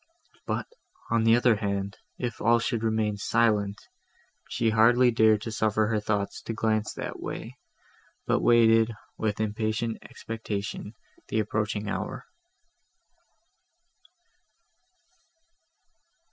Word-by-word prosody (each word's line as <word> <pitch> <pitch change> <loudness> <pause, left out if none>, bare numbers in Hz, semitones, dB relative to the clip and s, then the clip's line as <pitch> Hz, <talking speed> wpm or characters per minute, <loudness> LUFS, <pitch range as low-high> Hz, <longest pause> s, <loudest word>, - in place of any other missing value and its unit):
But, - - -1 0.5
on 115 -1 +2
the 115 0 +6
other 120 -2 +4
hand, 100 -1 -3 0.2
if 120 -3 -4
all 120 +2 +5
should 115 0 -1 0.2
be 105 -2 0
silent! 105 -2 +1 0.7
She 115 - +1
hardly 120 +3 +5
dared 110 -2 +4
to 115 - -4
suffer 110 0 +1
her 110 -2 +1
thoughts 105 -1 -2
to 115 - -5
glance 110 -1 0
that - - -6
way, - - -7 0.7
but - - +2
waited, 115 -1 +5 0.3
with 105 -2 -1
impatient 110 +1 -1
expectation, 105 -1 -6 0.3
the - - 0
approaching - - -1
hour. - - -4
110 Hz, 105 wpm, -27 LUFS, 105-115 Hz, 0.7 s, the